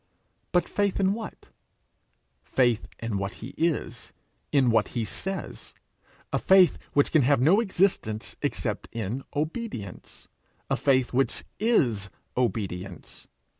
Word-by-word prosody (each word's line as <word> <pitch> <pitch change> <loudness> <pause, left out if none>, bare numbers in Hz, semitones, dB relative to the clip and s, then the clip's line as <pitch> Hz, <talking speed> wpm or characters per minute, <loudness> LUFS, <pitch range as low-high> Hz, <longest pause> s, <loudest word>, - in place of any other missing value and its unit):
But 175 - +2
faith 200 -1 0
in 195 0 +3
what? 220 0 -8 0.9
Faith 120 -4 +1
in 115 -4 -3
what 100 0 -3
he 115 - -8
is, 165 -2 -1 0.4
in 135 -4 +4
what 115 -2 +3
he 115 - 0
says 195 - -6 0.6
a - - +2
faith 190 -2 +5
which 145 - +3
can 155 - +5
have 140 +1 +4
no 160 - +5
existence 185 - 0
except - - -2
in 115 +3 -3
obedience 150 - -5 0.4
a - - +4
faith 130 -3 +2
which 135 +2 +1 0.2
is 125 - +2 0.3
obedience. 95 -7 -3
130 Hz, 125 wpm, -27 LUFS, 110-185 Hz, 0.9 s, faith